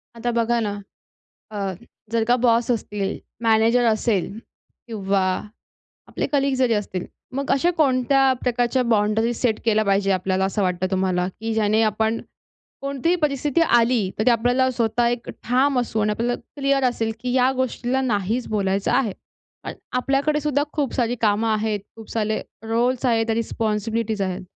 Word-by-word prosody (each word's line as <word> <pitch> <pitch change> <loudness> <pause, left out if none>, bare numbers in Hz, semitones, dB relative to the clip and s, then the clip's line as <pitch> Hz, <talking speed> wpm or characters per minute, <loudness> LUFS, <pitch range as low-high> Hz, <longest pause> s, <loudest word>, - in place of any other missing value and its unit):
आता 240 +1 -2
बघा 235 0 +1
ना, 205 -2 -1 0.8
अ, 215 - -8 0.6
जर 230 -1 +2
का 245 - +5
बॉस 235 0 +3
असतील, 210 -3 -2 0.3
मॅनेजर 230 +2 +4
असेल 215 -3 +1 0.6
किंवा 200 -4 -1 0.9
आपले - - -2
कलीग 275 -1 +2
जरी 255 -3 +2
असतील 195 -3 -3 0.3
मग 280 +1 -3
अशा 335 +6 +3
कोणत्या 270 -2 +3
प्रकारच्या 245 +1 +1
बाउंडरी 215 +2 +2
सेट 225 -2 0
केल्या 215 -1 +2
पाहिजे 195 0 +2
आपल्याला 185 +1 0
असं 195 +1 -1
वाटतं 180 0 0
तुम्हाला? 185 -1 0
की 225 +4 -5
ज्याने 215 0 +2
आपण 220 +1 +1 0.6
कोणतीही 280 +5 0
परिस्थिती 290 +1 +1
आली 235 - +3
तर 215 - +2
ती 250 - +6
आपल्याला 245 +3 +2
स्वतः 235 -1 +1
एक 240 0 -3
ठाम 255 +3 +2
असू 230 -2 -2
आणि 210 0 +1
आपल्याला 235 +3 -1 0.2
क्लिअर 275 0 +2
असेल, 235 -3 0
की 250 +1 -3
या 255 0 +4
गोष्टीला 260 0 -1
नाहीच 225 0 -1
बोलायचं 195 -2 0
आहे 230 -8 +1 0.5
अन् - - -5 0.2
आपल्याकडे 275 +4 +1
सुद्धा 290 -1 +1
खूप 290 -4 -1
सारी 245 -1 0
कामं 215 0 +2
आहेत, 215 -1 -1 0.2
खूप 225 -1 -12
सारे 220 -1 -1 0.2
रोल्स 240 +3 0
आहेत 230 -2 +2
रिस्पॉन्सिबिलिटीज 220 -1 -1
आहेत. 185 0 -2
230 Hz, 155 wpm, -22 LUFS, 210-255 Hz, 0.9 s, ती